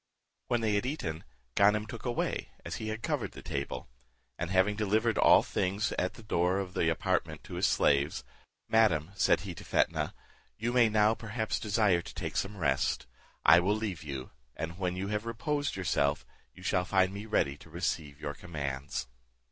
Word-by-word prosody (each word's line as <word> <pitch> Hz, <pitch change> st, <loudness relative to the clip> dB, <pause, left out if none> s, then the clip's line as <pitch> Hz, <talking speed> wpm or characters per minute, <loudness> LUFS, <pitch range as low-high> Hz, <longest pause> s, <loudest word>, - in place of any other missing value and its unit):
When 120 Hz, -1 st, +1 dB
they 110 Hz, -2 st, +1 dB
had 105 Hz, +4 st, +1 dB
eaten, 85 Hz, -, -3 dB, 0.3 s
Ganem 105 Hz, -, +4 dB
took 115 Hz, +1 st, -8 dB
away, 120 Hz, -1 st, -1 dB, 0.2 s
as -, -, -4 dB
he 110 Hz, -, -5 dB
had 110 Hz, +1 st, -4 dB
covered -, -, -1 dB
the -, -, -10 dB
table; 70 Hz, -3 st, -4 dB, 0.5 s
and 85 Hz, +4 st, -3 dB
having 95 Hz, +3 st, +3 dB
delivered 110 Hz, +2 st, +1 dB
all -, -, +7 dB
things 100 Hz, +4 st, -1 dB
at 90 Hz, -, -1 dB
the 115 Hz, -, -12 dB
door 90 Hz, -2 st, +1 dB
of 95 Hz, -2 st, -3 dB
the 80 Hz, -, +2 dB
apartment 80 Hz, -, -1 dB
to -, -, -10 dB
his -, -, +2 dB
slaves, 70 Hz, +1 st, +2 dB, 0.4 s
"Madam," 95 Hz, -8 st, +3 dB
said 95 Hz, -, +3 dB
he 95 Hz, -2 st, -5 dB
to -, -, -10 dB
Fetnah, -, -, +1 dB, 0.4 s
"you 120 Hz, +3 st, -1 dB
may 120 Hz, -3 st, +5 dB
now 105 Hz, 0 st, +4 dB
perhaps 110 Hz, 0 st, -3 dB
desire 105 Hz, -4 st, +2 dB
to -, -, -11 dB
take -, -, -4 dB
some 100 Hz, +1 st, -1 dB
rest; 70 Hz, -5 st, +1 dB, 0.4 s
I 85 Hz, +4 st, +9 dB
will 100 Hz, +4 st, +2 dB
leave 105 Hz, -6 st, -3 dB
you, 70 Hz, -4 st, -6 dB, 0.2 s
and 85 Hz, +3 st, -5 dB
when 90 Hz, -2 st, -1 dB
you 95 Hz, +2 st, -3 dB
have 105 Hz, +2 st, -2 dB
reposed 145 Hz, +5 st, -1 dB
yourself, 75 Hz, -6 st, +1 dB, 0.3 s
you 90 Hz, -, -15 dB
shall 90 Hz, -1 st, +2 dB
find 95 Hz, 0 st, +2 dB
me 100 Hz, +2 st, -6 dB
ready 70 Hz, -10 st, +1 dB
to 85 Hz, -, -15 dB
receive 80 Hz, -3 st, -3 dB
your 75 Hz, -1 st, -4 dB
commands." 70 Hz, -6 st, -4 dB
95 Hz, 185 wpm, -31 LUFS, 80-110 Hz, 0.5 s, I